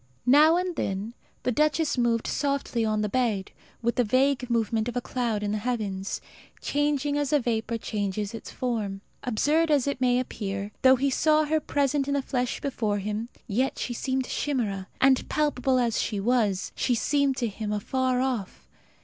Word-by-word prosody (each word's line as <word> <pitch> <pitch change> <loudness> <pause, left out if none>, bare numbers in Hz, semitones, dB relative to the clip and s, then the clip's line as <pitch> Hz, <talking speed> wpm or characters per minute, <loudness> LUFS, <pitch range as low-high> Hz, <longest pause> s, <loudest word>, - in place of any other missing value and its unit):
Now 300 +6 +6
and 360 -1 -1
then 195 +4 -2 0.3
the 250 - +1
duchess 305 +3 +2
moved 235 -2 +1
softly 280 -4 -1
on 215 -1 +1
the - - +1
bed, 215 -4 0 0.3
with 235 +1 0
the 245 - +4
vague 255 +2 +2
movement 225 -1 +1
of 245 - -4
a - - +3
cloud 235 -4 -2
in 205 - -1
the 215 - -1
heavens, 205 -5 -2 0.4
changing 290 0 0
as 290 -1 -1
a 295 - +4
vapour 230 -2 -1
changes 205 -1 -3
its 225 - -7
form. 215 -6 -3 0.2
Absurd 295 +8 +2
as 290 -4 +3
it 280 -2 -2
may 250 -1 +3
appear, 200 -4 -4
though 260 0 +7
he 275 +2 0
saw 310 +3 +3
her 315 +1 +1
present 285 -1 0
in 285 - 0
the 280 - 0
flesh 250 -2 -1
before 220 -7 -1
him, 210 +3 -3 0.2
yet 255 +4 0
she 245 - -3
seemed 260 +2 -1
a - - -11
chimera; 210 -10 -1
and, 265 -1 +3
palpable 270 -4 +1
as 235 -3 +1
she 210 -3 -2
was, 210 -3 +1
she 245 - +1
seemed 280 +2 +1
to 240 - 0
him 210 0 -4
afar 255 +4 0
off. 245 -8 -3
245 Hz, 185 wpm, -26 LUFS, 215-275 Hz, 0.4 s, though